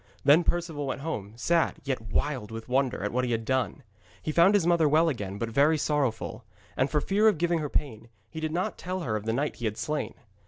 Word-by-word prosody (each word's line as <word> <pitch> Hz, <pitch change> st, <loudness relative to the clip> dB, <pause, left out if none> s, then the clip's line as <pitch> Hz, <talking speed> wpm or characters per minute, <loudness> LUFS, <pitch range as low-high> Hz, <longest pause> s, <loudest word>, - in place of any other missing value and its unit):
Then 150 Hz, +5 st, +6 dB
Perceval 165 Hz, -5 st, -1 dB
went 135 Hz, -, -3 dB
home, 110 Hz, -10 st, -4 dB
sad, 165 Hz, +7 st, +1 dB
yet 135 Hz, -5 st, -2 dB
wild 130 Hz, -5 st, -1 dB
with 115 Hz, 0 st, -7 dB
wonder 130 Hz, -4 st, 0 dB
at 105 Hz, -, -1 dB
what 125 Hz, +1 st, 0 dB
he 125 Hz, -, -1 dB
had 115 Hz, 0 st, -2 dB
done. 130 Hz, +2 st, -1 dB, 0.4 s
He 155 Hz, -, -3 dB
found 170 Hz, +6 st, +5 dB
his 195 Hz, -5 st, +3 dB
mother 170 Hz, -3 st, +4 dB
well 160 Hz, +3 st, +4 dB
again, 100 Hz, -8 st, -4 dB
but 115 Hz, +1 st, -3 dB
very 145 Hz, +7 st, +3 dB
sorrowful. 135 Hz, -6 st, -1 dB, 0.3 s
And 130 Hz, +2 st, +1 dB
for 150 Hz, -, +1 dB
fear 205 Hz, +6 st, +3 dB
of 210 Hz, -6 st, +4 dB
giving 170 Hz, +1 st, +1 dB
her 150 Hz, -2 st, -3 dB
pain, 115 Hz, -7 st, -3 dB, 0.2 s
he 160 Hz, -, -8 dB
did 155 Hz, -1 st, -2 dB
not 175 Hz, +3 st, -2 dB
tell 185 Hz, +1 st, -4 dB
her 120 Hz, -9 st, -2 dB
of 105 Hz, 0 st, -4 dB
the 115 Hz, -, 0 dB
knight 145 Hz, +5 st, -1 dB
he 120 Hz, -, -5 dB
had 110 Hz, 0 st, -2 dB
slain. 150 Hz, 0 st, -3 dB
145 Hz, 235 wpm, -28 LUFS, 115-160 Hz, 0.4 s, Then